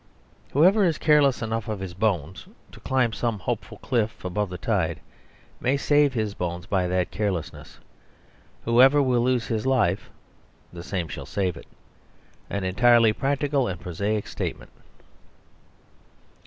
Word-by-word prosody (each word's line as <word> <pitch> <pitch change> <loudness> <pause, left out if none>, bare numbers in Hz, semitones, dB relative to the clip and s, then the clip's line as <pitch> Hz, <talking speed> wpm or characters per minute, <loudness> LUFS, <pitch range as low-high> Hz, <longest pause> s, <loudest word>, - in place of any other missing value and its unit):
Whoever 185 +9 +5
is 165 -4 +2
careless 145 -5 +3
enough 115 -1 -3
of 110 -3 -3
his 95 -2 -6
bones 95 -4 -2 0.2
to - - -14
climb 130 -4 0
some 115 -2 -1
hopeful 95 - -4
cliff 115 -5 -1
above 100 +2 -2
the 90 - -6
tide 85 -5 -1 0.6
may 135 +3 +1
save 145 0 +3
his 110 -3 -1
bones 85 -3 -4
by 95 -1 0
that 90 0 -1
carelessness. 95 -7 -4 0.9
Whoever 130 +5 +6
will 130 -4 +2
lose 125 -1 +1
his 115 +2 -2
life, 105 -7 +1 0.6
the 85 - -8
same 90 -1 -3
shall - - -8
save 95 -4 -1
it; - - -12 0.8
an 100 -1 -3
entirely 115 +4 +4
practical 140 +1 0
and 90 -3 -4
prosaic 100 +5 -2
statement. - - -5
110 Hz, 140 wpm, -25 LUFS, 95-130 Hz, 0.9 s, Whoever